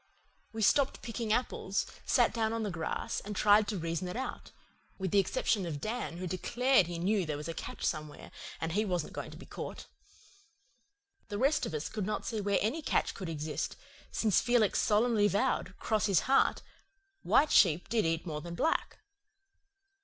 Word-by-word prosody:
We 220 -1 -3
stopped 275 +6 +3
picking 230 -1 -3
apples, 215 -4 0 0.2
sat 245 -3 +3
down 225 -1 0
on 230 -1 -2
the 205 - -2
grass, 165 -2 -3
and 210 +1 -7
tried 210 +1 +5
to 210 - -2
reason 170 +1 -2
it 180 - -5
out 260 - -5 0.5
with 190 -3 -3
the 200 - +5
exception 195 +1 +1
of 150 -3 -4
Dan, 215 -2 -3
who 185 - -4
declared 235 +4 +2
that - - -8
he 175 - -4
knew 195 +3 +1
there 155 -3 -3
was 150 +2 -6
a 165 - -3
catch - - -6
somewhere 150 -2 -4 0.3
and 165 - -2
he 210 +5 +1
wasn't 180 -6 -2
going - - -5
to - - -11
be - - -12
caught. - - -7 1.4
The 205 - -4
rest 275 +7 +2
of - - -5
us 150 - -3
could 210 -3 -4
not 215 - -2
see 220 -3 -2
where 200 0 +1
any 275 +10 -1
catch - - 0
could 185 -4 -6
exist, 155 -1 -3 0.4
since 215 -5 +2
Felix 240 -4 +3
solemnly 215 0 +3
vowed, 200 -2 0
'cross 215 -1 0
his 195 -5 +3
heart, 270 +1 +2 0.6
white 300 - +3
sheep 175 -3 +5
did 230 -2 +1
eat 165 +1 -1
more 150 -3 -4
than 170 +2 -7
black. 320 - 0
205 Hz, 190 wpm, -31 LUFS, 170-225 Hz, 1.4 s, tried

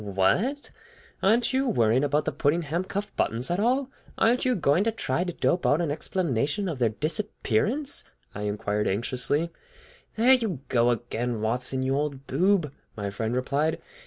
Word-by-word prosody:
"What! 140 - 0 0.5
Aren't 230 +6 +3
you 265 +1 +1
worrying 120 - +3
about 145 +1 +1
the 155 - 0
Puddingham 155 +4 0
cuff 200 +2 -4
buttons 120 +7 -1
at 175 - 0
all? 255 +5 +1 0.3
Aren't 240 +4 +3
you 255 -1 +2
going 165 +1 +2
to 225 - +2
try 220 -5 -1
to 180 - -3
dope 175 +1 0
out 145 - +3
an 165 -4 0
explanation 155 - -1
of 155 -7 -3
their 120 -2 +3
disappearance?" 205 - -1 0.3
I 105 - -4
inquired 105 0 -1
anxiously. 130 - 0 0.6
"There 240 +4 +5
you 220 - 0
go 120 -1 +3
again, 120 0 -2
Watson, 125 +4 0
you 135 +1 +1
old 140 -2 -2
boob!" 170 +1 +2 0.3
my 100 -1 -3
friend 110 +4 -2
replied. 140 +5 0
150 Hz, 160 wpm, -26 LUFS, 120-200 Hz, 0.6 s, There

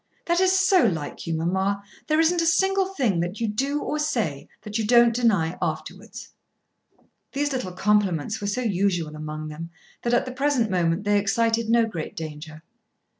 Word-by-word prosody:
"That 345 0 +2
is 375 0 +4
so 380 -1 +4
like 160 -6 -4
you, 165 - -1
mamma. 190 +5 -1 0.2
There 310 0 +2
isn't 335 +1 +3
a - - 0
single 385 +2 +2
thing 255 - 0
that 175 +4 -3
you 230 - 0
do 275 +8 -1
or 300 - -2
say 230 - -2 0.2
that 210 +1 -3
you - - 0
don't 235 0 +6
deny 200 -8 +1
afterwards." - - -5 1.0
These 290 0 -1
little 220 -9 -3
compliments 205 0 +1
were 200 - -2
so 210 +5 -1
usual 185 -7 0
among 155 0 -6
them 165 +2 -7 0.3
that 240 0 +1
at - - +1
the 255 - -5
present 255 -4 0
moment 175 +1 +1
they 205 0 +3
excited 225 +2 +1
no 230 0 +4
great 170 -8 -6
danger. 155 0 -8
210 Hz, 175 wpm, -24 LUFS, 170-260 Hz, 1.0 s, don't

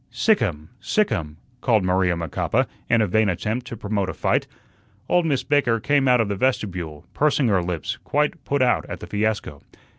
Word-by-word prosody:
"Sick 220 -2 +2
'im, 75 -7 -2
sick 215 -1 +1
'im," 75 -1 -3 0.2
called 110 -7 +3
Maria 90 -1 +2
Macapa, 85 -3 0 0.2
in 115 -1 +4
a - - 0
vain 110 +3 +2
attempt 110 +8 -2
to 115 - -6
promote 100 -2 -2
a - - -5
fight. - - 0 0.6
Old 175 -2 +2
Miss 140 -4 0
Baker 140 -6 +2
came 140 +3 +2
out 125 -1 +5
of 115 - +2
the 100 - -2
vestibule, 90 - -2
pursing 140 -4 +2
her 95 -3 +3
lips, 85 -2 -3
quite 150 +1 0
put 140 -2 +1
out 125 - +2
at - - -6
the - - -8
fiasco. 105 -8 -2
110 Hz, 190 wpm, -23 LUFS, 90-130 Hz, 0.6 s, out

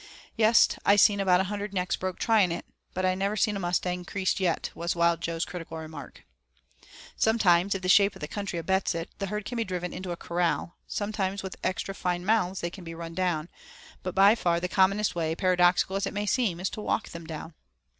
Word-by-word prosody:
"Yes! 225 0 +6 0.2
I 200 - +5
seen 205 0 +5
about 185 -2 +4
a - - +1
hundred 205 +1 -4
necks 180 -1 0
broke 185 -1 -4
trying 215 -6 +3
it, 170 - -4 0.3
but 185 +1 0
I 185 - +3
never 200 +3 -1
seen 210 -1 +2
a - - -3
mustang 180 0 -1
creased 190 +1 -1
yet," 180 -4 0
was 170 +1 -2
Wild 170 -1 +2
Jo's 165 0 -2
critical 165 -2 -7
remark. 160 0 -9 0.9
Sometimes, 200 -4 +3
if 190 - -5
the - - -1
shape 200 +2 +5
of - - -11
the 150 - -5
country 200 -2 -4
abets 190 +2 0
it, 165 0 -4
the 200 - -2
herd 210 +1 -4
can 245 - -4
be 230 - +1
driven 180 -3 -4
into 185 -1 -6
a 175 - -3
corral; 170 0 -1
sometimes 200 -2 -2
with 190 - -6
extra 185 +1 -2
fine 180 -2 -2
mounts 195 -3 +1
they 170 - -3
can 185 0 -10
be 165 -1 -7
run 165 0 -7
down, 170 -3 -1 0.5
but 185 - -5
by 195 +2 +7
far 175 -7 +1
the 180 - -2
commonest 195 +3 +2
way, 160 -2 -1
paradoxical 180 0 +3
as 195 - 0
it - - -6
may 205 0 -1
seem, 205 -6 0
is 185 - -2
to 215 - -6
walk 215 - -1
them 170 -1 -9
down. 160 +1 -7
185 Hz, 220 wpm, -27 LUFS, 170-200 Hz, 0.9 s, by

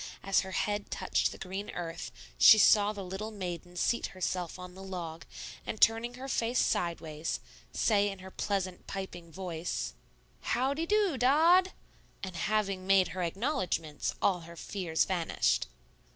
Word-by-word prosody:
As 195 0 +3
her 190 -1 -4
head 205 +1 -1
touched - - 0
the - - -9
green 195 +2 -5
earth, 165 -2 -5 0.3
she 215 - +10
saw 210 -1 +6
the 205 -2 -6
little 195 +4 -4
maiden 180 -4 -6
seat 235 +6 +1
herself 180 -2 -3
on 180 0 -9
the 190 - -11
log, 175 -4 -6 0.4
and 215 - -5
turning 230 +2 +3
her 260 +2 -7
face 240 -2 0
sideways, 165 -2 -1 0.3
say 205 -2 +2
in 195 - -6
her 190 0 -11
pleasant, 185 -3 -2
piping 175 -3 -6
voice, 175 -1 -4 0.5
"How 260 +3 +1
de 325 +3 -3
do, 410 -9 +2
Dod?" 330 +9 +5 0.5
And 190 -2 -5
having 195 0 -1
made 195 -1 +5
her 185 - -4
acknowledgments, 180 - -1
all 185 -3 +3
her 170 0 -11
fears 170 -2 -1
vanished. 175 -3 +1
190 Hz, 150 wpm, -31 LUFS, 175-215 Hz, 0.5 s, she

